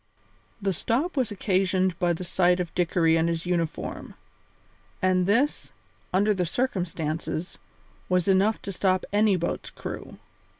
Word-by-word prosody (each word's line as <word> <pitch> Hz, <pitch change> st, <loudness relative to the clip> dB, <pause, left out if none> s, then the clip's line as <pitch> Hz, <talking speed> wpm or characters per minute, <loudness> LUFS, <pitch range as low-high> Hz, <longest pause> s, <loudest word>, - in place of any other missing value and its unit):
The 195 Hz, -1 st, 0 dB
stop 265 Hz, -, -1 dB
was 255 Hz, -5 st, +1 dB
occasioned 185 Hz, -2 st, +1 dB
by 175 Hz, -2 st, +2 dB
the 170 Hz, -, -5 dB
sight 180 Hz, 0 st, +2 dB
of 175 Hz, -2 st, -3 dB
Dickory 165 Hz, -2 st, +2 dB
in 165 Hz, +1 st, +2 dB
his 170 Hz, 0 st, -2 dB
uniform; 170 Hz, -3 st, -3 dB, 0.8 s
and 185 Hz, -1 st, +2 dB
this, 250 Hz, +9 st, +1 dB, 0.4 s
under 205 Hz, +3 st, +3 dB
the 185 Hz, -2 st, 0 dB
circumstances, 170 Hz, -5 st, -2 dB, 0.5 s
was 180 Hz, 0 st, +2 dB
enough 195 Hz, +3 st, +3 dB
to 200 Hz, -, -4 dB
stop 185 Hz, 0 st, +1 dB
any 205 Hz, -1 st, +4 dB
boat's 170 Hz, -1 st, -3 dB
crew. -, -, -8 dB
185 Hz, 135 wpm, -26 LUFS, 175-200 Hz, 0.8 s, any